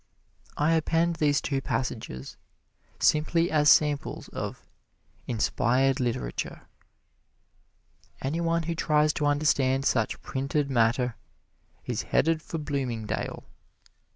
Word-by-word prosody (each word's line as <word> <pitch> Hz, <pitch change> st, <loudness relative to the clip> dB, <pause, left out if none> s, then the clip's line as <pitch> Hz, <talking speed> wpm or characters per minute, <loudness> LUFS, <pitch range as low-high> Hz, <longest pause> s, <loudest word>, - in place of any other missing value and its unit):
I 150 Hz, +2 st, +2 dB
append 165 Hz, +1 st, +1 dB
these 145 Hz, -2 st, +2 dB
two 135 Hz, -1 st, -1 dB
passages 110 Hz, -, -4 dB, 0.6 s
simply 165 Hz, +2 st, +2 dB
as 150 Hz, -1 st, +4 dB
samples 150 Hz, -2 st, +2 dB
of -, -, -6 dB, 0.6 s
"inspired 125 Hz, +3 st, +1 dB
literature." 115 Hz, -, -3 dB, 1.6 s
Any 150 Hz, +6 st, -2 dB
one 165 Hz, 0 st, +1 dB
who 165 Hz, +1 st, -2 dB
tries 150 Hz, -2 st, +2 dB
to 145 Hz, -, 0 dB
understand 140 Hz, -2 st, +2 dB
such 110 Hz, -6 st, +1 dB
printed 140 Hz, +1 st, -1 dB
matter 120 Hz, 0 st, +2 dB, 0.7 s
is -, -, -2 dB
headed 160 Hz, +2 st, +1 dB
for 165 Hz, -, -5 dB
Bloomingdale. 130 Hz, -8 st, -3 dB
145 Hz, 100 wpm, -27 LUFS, 125-155 Hz, 1.6 s, as